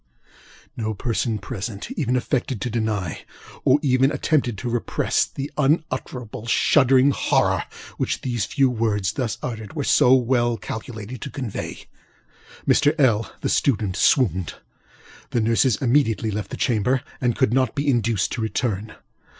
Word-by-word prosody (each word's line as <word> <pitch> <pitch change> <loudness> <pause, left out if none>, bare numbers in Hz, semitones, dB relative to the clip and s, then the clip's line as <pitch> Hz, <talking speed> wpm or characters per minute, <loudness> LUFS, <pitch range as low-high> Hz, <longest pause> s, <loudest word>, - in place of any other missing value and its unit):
ŌĆØ - - -36 0.5
No 110 0 -1
person 115 0 -1
present 105 - -6
even 140 - -1
affected 125 -2 -1
to 120 - -2
deny, 105 -7 -2 0.4
or 135 +3 +4
attempted 135 -2 +2
to 120 - -5
repress, 120 0 0
the 140 +1 -6
unutterable, 130 -6 -1
shuddering 135 +2 +4
horror - - +1 0.3
which - - -1
these 120 -4 -2
few 135 -2 +2
words, 110 -6 0
thus 120 -2 -3
uttered, 110 -2 -5
were 145 - -2
so 130 -1 +5
well 120 -2 +1
calculated 115 -1 -7
to - - -5
convey. 125 -4 -6 0.8
Mr. 150 0 +4
LŌĆöl 115 - +2
(the - - -1
student) 105 -8 +1
swooned. 95 - +2 0.7
The 120 - 0
nurses 115 +2 +3
immediately 120 -4 +2
left 105 0 -4
the - - -6
chamber, 125 +1 +1 0.2
and 120 -3 +1
could 130 -4 +2
not 130 -3 +1
be 145 +1 -2
induced 115 -6 +1
to 120 - -3
return. 110 -1 -2
120 Hz, 140 wpm, -23 LUFS, 110-130 Hz, 0.8 s, so